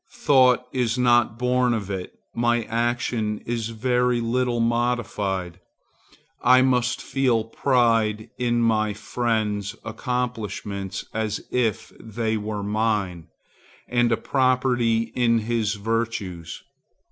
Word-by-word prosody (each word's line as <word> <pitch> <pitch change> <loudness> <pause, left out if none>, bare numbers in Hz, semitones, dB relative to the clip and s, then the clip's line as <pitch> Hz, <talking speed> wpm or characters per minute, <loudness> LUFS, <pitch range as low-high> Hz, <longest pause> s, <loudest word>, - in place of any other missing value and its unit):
Thought 125 -2 +4
is 125 -2 0
not 120 -2 +3
born 125 0 +2
of 100 -3 -4
it; 95 -2 -5 0.2
my 120 0 +1
action 115 -1 -1
is 115 -1 -2
very 125 +1 +1
little 120 +1 0
modified. 115 -7 -1 0.8
I 130 +1 +6
must 125 -1 +1
feel 125 -5 +1
pride 115 -3 +1
in 120 -1 +1
my 110 -2 +2
friend's 105 -2 -2
accomplishments 110 -5 -4
as 110 -1 -2
if 120 -4 -1
they 110 0 -2
were 105 -1 -3
mine, 105 -5 -1 0.6
and 120 -1 +2
a 115 - +3
property 125 -4 +1
in 120 -2 +3
his 110 -1 -1
virtues. 100 -6 -3
115 Hz, 110 wpm, -24 LUFS, 105-125 Hz, 0.8 s, I